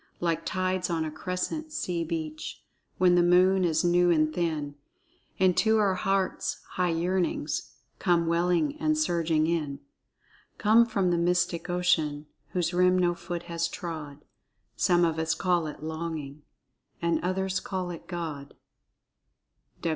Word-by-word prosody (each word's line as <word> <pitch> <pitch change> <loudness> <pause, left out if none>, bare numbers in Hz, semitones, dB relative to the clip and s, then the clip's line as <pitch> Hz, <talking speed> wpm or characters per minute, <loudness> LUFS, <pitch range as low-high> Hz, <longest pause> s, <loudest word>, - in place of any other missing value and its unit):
"Like 165 -1 -1
tides 185 -1 -1
on 165 -2 0
a 155 - -4
crescent 185 - -4
sea 175 - -2
beach, 155 -1 -5 0.3
When 180 -1 +4
the 175 - +5
moon 185 +2 +4
is 160 -2 +1
new 175 0 +4
and 155 -2 +3
thin, 155 -4 -2 0.6
Into 190 +4 +3
our 205 -3 +3
hearts 195 +1 -1
high 180 -1 0
yearnings 175 +2 -1 0.3
Come 175 -3 +2
welling 175 - +1
and 310 0 +1
surging 165 - +1
in,— 155 -4 -1 0.8
Come 225 +2 +5
from 195 -5 +1
the 170 - +1
mystic 175 0 0
ocean 155 -4 +1 0.2
Whose 175 -1 -1
rim 180 +1 +4
no 175 -1 +2
foot 175 0 -6
has 170 -1 -2
trod,— 155 -5 -7 0.5
Some 175 -1 +3
of 160 -1 -1
us 160 0 0
call 175 -4 +1
it 150 - -8
Longing, 160 -3 -5 0.6
And 170 0 0
others 190 +1 0
call 185 -2 -4
it 170 - -9
God." 160 -6 -6
175 Hz, 140 wpm, -28 LUFS, 160-185 Hz, 0.8 s, the